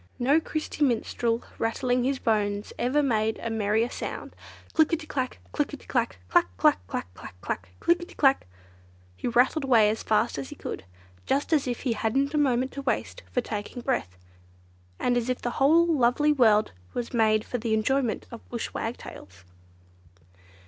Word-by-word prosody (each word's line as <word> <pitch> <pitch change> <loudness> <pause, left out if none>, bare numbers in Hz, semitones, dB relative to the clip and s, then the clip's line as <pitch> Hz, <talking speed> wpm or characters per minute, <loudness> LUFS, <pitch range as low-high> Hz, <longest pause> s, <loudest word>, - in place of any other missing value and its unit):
No 275 +6 +4
Christy 310 -1 -3
Minstrel 235 -2 0 0.2
rattling 245 +2 +1
his 270 +1 +1
bones 205 -3 0
ever 265 +5 +2
made 220 -4 +1
a 230 - -4
merrier 220 +1 +1
sound. - - -6 0.4
"Click 315 -1 +4
i - - +6
ti 320 0 -8
clack, 260 -4 -3
click - - -1
i - - -12
ti - - -19
clack, 95 - -1
clack, 90 - +4
clack, 90 - +4
clack, 90 +1 -5 0.3
clack, 90 0 -4
click 345 +1 +2
i - - -5
ti - - -16
clack," 270 - +3 0.7
he - - -4
rattled 250 +6 +3
away 225 -5 +5
as 220 - -4
fast 210 -9 +1
as 135 - -6
he - - -8
could, - - -6 0.4
just 280 +4 +1
as 290 -4 +2
if 245 -2 -2
he 245 - 0
hadn't 270 +6 0
a 300 - +2
moment 260 -2 +2
to 275 - -6
waste 390 - -2
for 250 - +1
taking 225 +2 -5
breath, 95 - -1 0.8
and 245 0 +1
as 240 +1 -1
if 255 - 0
the 240 - -2
whole 325 +5 +6
lovely 295 -2 +3
world 220 -6 +4 0.2
was 240 0 -3
made 215 -2 +3
for 245 - -3
the 220 -1 0
enjoyment 240 +2 0
of 235 - -11
Bush 235 -2 -4
Wagtails. 95 - -7
245 Hz, 180 wpm, -27 LUFS, 220-275 Hz, 0.8 s, i